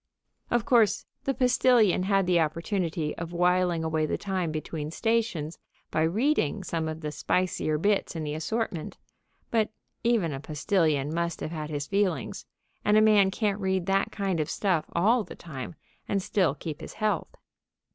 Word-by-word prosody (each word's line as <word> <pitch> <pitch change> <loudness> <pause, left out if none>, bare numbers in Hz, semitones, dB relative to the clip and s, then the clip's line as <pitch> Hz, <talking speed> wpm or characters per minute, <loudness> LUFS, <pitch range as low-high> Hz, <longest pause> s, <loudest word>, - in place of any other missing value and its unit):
Of 240 -1 +1
course, 230 -4 +3 0.2
the 275 - +1
postilion 250 -6 +4
had 195 0 +2
the 180 -1 +3
opportunity 165 0 -1
of 170 0 -5
whiling 180 -1 +2
away 160 -1 0
the - - -1
time 185 -4 -2
between 155 -1 -4
stations 200 -6 -1 0.3
by 155 - +1
reading 200 - +1
some 165 -3 -2
of 160 0 -5
the 150 -1 -3
spicier 155 0 0
bits 200 +2 +1
in 160 - -3
the 150 -1 -3
assortment, 170 +1 -3 0.5
but 220 -2 +2 0.3
even 220 -10 +2
a 135 - -4
postilion 155 -1 0
must 170 0 -1
have 155 - -3
had 155 -2 -4
his 145 -2 -3
feelings, 200 0 -1 0.4
and 210 +1 +4
a - - +8
man 210 -3 +5
can't 205 0 -1
read 190 -2 0
that 195 +1 +1
kind 195 -4 -1
of 155 0 -1
stuff 185 -6 0
all 220 +8 +3
of - - -8
the - - -9
time, 155 -1 -7 0.3
and 195 -2 0
still 180 -7 +1
keep 150 +1 -6
his - - -8
health. 215 -1 -1
180 Hz, 170 wpm, -27 LUFS, 155-205 Hz, 0.5 s, a